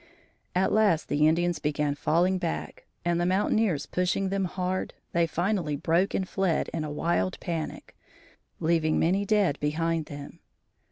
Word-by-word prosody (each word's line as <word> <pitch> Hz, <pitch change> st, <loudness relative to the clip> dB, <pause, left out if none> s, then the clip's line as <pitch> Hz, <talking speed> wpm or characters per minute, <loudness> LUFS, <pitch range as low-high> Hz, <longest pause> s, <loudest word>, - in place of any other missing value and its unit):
At 190 Hz, +1 st, +2 dB
last 205 Hz, -7 st, +3 dB
the 150 Hz, +1 st, +3 dB
Indians 175 Hz, +2 st, +1 dB
began 150 Hz, -1 st, 0 dB
falling 175 Hz, +6 st, +1 dB
back 75 Hz, -, -4 dB, 0.2 s
and 175 Hz, 0 st, +1 dB
the -, -, +1 dB
mountaineers 190 Hz, -4 st, +1 dB
pushing 180 Hz, +2 st, 0 dB
them 195 Hz, 0 st, 0 dB
hard, 185 Hz, +1 st, -3 dB, 0.2 s
they 170 Hz, -1 st, +2 dB
finally 175 Hz, -2 st, -1 dB
broke 165 Hz, +6 st, +1 dB
and 190 Hz, -, -1 dB
fled 190 Hz, -5 st, 0 dB
in 160 Hz, -, -2 dB
a 155 Hz, -, -4 dB
wild 145 Hz, -, 0 dB
panic, 165 Hz, -3 st, -5 dB, 0.6 s
leaving 160 Hz, -1 st, +2 dB
many 190 Hz, +5 st, +2 dB
dead 200 Hz, -8 st, +2 dB
behind 160 Hz, +1 st, -1 dB
them. 145 Hz, -2 st, -9 dB
170 Hz, 150 wpm, -27 LUFS, 155-185 Hz, 0.6 s, last